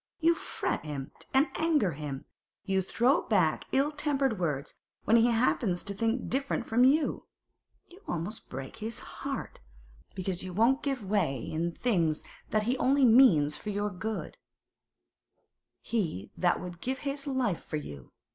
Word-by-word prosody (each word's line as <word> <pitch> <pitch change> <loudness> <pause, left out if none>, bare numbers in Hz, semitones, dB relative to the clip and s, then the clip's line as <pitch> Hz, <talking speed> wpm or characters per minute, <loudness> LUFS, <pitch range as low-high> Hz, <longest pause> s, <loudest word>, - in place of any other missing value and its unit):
You 335 0 +5
fret - - -3
him 140 -3 -5 0.2
and 270 +2 +5
anger 310 - +2
him; 140 -2 -6 0.4
you 190 -1 +1
throw 245 - +2
him - - -17
back - - +2
ill 280 +3 +2
tempered 280 -7 0
words 150 -4 -2 0.3
when 225 - +4
he 230 +1 +5
happens 230 -6 +1
to 200 - -2
think 225 +4 -1
different 270 -2 -1
from 240 +2 +3
you; 285 +4 +3 0.6
you 365 +3 -16
almost 175 +6 -4
break 135 +1 -7
his 220 +1 -4
heart, - - -6 0.6
because 185 -1 -3
you 185 -1 -6
won't 235 +8 +3
give 270 -7 -2
way 185 -10 +1
in 160 +7 -2
things 170 -8 0 0.3
that 215 0 +1
he 240 +4 +1
only 275 +1 +4
means 195 - +6
for 210 - -6
your 205 0 -1
good—he 195 - -7
that 175 -1 +2
would 175 -1 -8
give 260 +1 -2
his 280 +1 -3
life 255 - 0
for 155 - -3
you! 70 - -9
215 Hz, 155 wpm, -30 LUFS, 170-265 Hz, 0.6 s, means